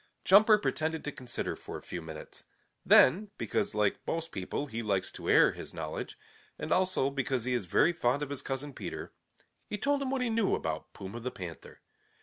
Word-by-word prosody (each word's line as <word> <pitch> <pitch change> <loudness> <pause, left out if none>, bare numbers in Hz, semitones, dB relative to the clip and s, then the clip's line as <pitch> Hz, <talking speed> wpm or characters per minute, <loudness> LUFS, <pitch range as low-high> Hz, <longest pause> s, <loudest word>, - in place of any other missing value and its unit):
Jumper 210 +3 +7
pretended 160 -5 -1
to 150 - -3
consider 125 -3 -4
for - - -8
a - - -12
few 90 - -6
minutes. 80 -1 -9 0.4
Then, 195 +10 +6
because 205 - -1
like 105 -2 +2
most 165 0 -2
people 95 +9 -3
he 115 -4 -4
likes 100 -4 -1
to - - -6
air - - +6
his - - -8
knowledge, - - -5 0.4
and - - -5
also 185 -7 +2
because 130 -3 -1
he 130 - 0
is 120 -6 0
very 170 - +4
fond 140 -3 +1
of 145 - -5
his 140 - -3
cousin 135 +1 -4
Peter, - - -6 0.6
he 210 - -3
told 280 +5 +1
him 270 - -1
what 265 -1 0
he 245 - 0
knew 225 -3 +2
about 80 -1 -4
Puma 100 +4 -7
the 125 +2 -3
Panther. 90 -8 -9
140 Hz, 195 wpm, -31 LUFS, -, 0.6 s, Jumper